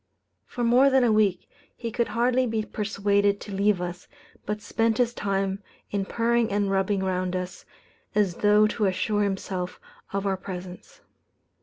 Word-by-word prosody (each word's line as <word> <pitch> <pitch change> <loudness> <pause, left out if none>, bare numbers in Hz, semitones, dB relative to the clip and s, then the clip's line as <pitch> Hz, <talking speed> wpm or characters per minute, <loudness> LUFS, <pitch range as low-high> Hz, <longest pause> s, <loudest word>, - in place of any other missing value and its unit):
For 245 - -4
more 250 +4 +5
than 265 -1 +4
a 235 - +4
week 205 -4 +2 0.3
he 230 -2 -5
could 235 0 0
hardly 250 +2 +1
be 220 -1 -1
persuaded 200 -1 +1
to 205 - -8
leave 200 0 +2
us, 175 0 -5 0.4
but 210 +1 -2
spent 225 +1 0
his 240 -1 +2
time 195 -2 -1 0.3
in 200 -1 -1
purring 235 +1 +1
and 200 -1 +1
rubbing 195 0 +1
round 185 -1 -1
us, 180 0 -5 0.5
as 200 -5 +2
though 210 +1 +5
to 215 0 0
assure 200 +3 0
himself 190 -2 -3 0.3
of 200 0 -2
our 195 -1 0
presence." 180 -1 -9
205 Hz, 160 wpm, -26 LUFS, 190-225 Hz, 0.5 s, more